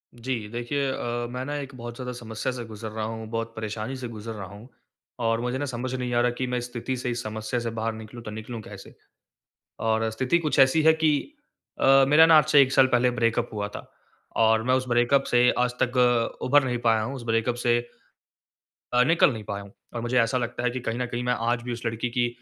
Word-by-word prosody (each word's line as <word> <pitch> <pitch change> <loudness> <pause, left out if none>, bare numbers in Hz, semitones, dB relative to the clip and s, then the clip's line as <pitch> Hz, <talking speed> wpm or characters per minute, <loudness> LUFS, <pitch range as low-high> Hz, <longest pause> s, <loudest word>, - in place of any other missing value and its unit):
जी 125 +3 -3 0.2
देखिए, 135 +4 -1
अ, 120 -1 -3
मैं 125 +1 -4
ना 145 0 -4
एक 140 -1 -6
बहुत 120 -1 -7
ज़्यादा 125 0 -5
समस्या 115 +1 -4
से 125 -1 -6
गुज़र 110 0 -7
रहा 110 0 -4
हूँ, 110 0 -6
बहुत 115 0 -3
परेशानी 110 +3 -4
से 125 -1 -5
गुज़र 115 -1 -7
रहा 100 -3 -7
हूँ। 100 +5 -12 0.5
और 115 -1 +1
मुझे 125 +1 -2
ना, 145 - -2
समझ 130 -1 -4
नहीं 125 -1 -3
आ 120 - +3
रहा 120 0 +2
कि 130 - -2
मैं 125 0 -1
इस 120 - -3
स्थिति 125 +2 -3
से, 125 - -3
इस 120 0 -3
समस्या 110 +3 -3
से 115 - -3
बाहर 110 +1 -1
निकलूँ 110 +2 -10
तो 105 - -7
निकलूँ 110 +2 -7
कैसे? - - -12 0.8
और 110 0 +1
स्थिति 130 +8 +1
कुछ 155 -3 0
ऐसी 135 +4 +5
है 160 +1 +7
कि 160 - +1 0.5
अ, - - +2 0.2
मेरा 150 +3 +7
ना 165 0 +6
आज 155 - +6
से 150 -2 +7
1 135 -1 +3
साल 135 -1 +5
पहले 125 0 +3
ब्रेकअप 120 0 0
हुआ 105 -1 -2
था। - - -7 0.6
और 110 0 +4
मैं 130 +2 +2
उस 130 0 +1
ब्रेकअप 120 +3 +3
से 120 - +5 0.2
आज 125 0 +1
तक 125 +1 +1
अ, 120 -2 +2
उभर 145 +2 +5
नहीं 125 -2 -1
पाया 110 -1 +4
हूँ। 125 +6 -4
उस 130 - -7
ब्रेकअप 115 +1 +1
से 120 0 +4 1.2
अ, 125 0 +5
निकल 160 +1 +4
नहीं 110 -2 -7
पाया 100 0 -5
हूँ। 100 - -14 0.2
और 120 - -2
मुझे 120 +2 0
ऐसा 115 +2 +2
लगता 120 -1 -3
है 125 - +2
कि 130 - -4
कहीं 115 +2 -3
न 125 - 0
कहीं 120 0 -4
मैं 125 0 +1 0.2
आज 120 -1 0
भी 120 0 -4
उस 120 0 -8
लड़की 115 +1 -2
की 120 -1 +3
120 Hz, 245 wpm, -25 LUFS, 115-130 Hz, 1.2 s, है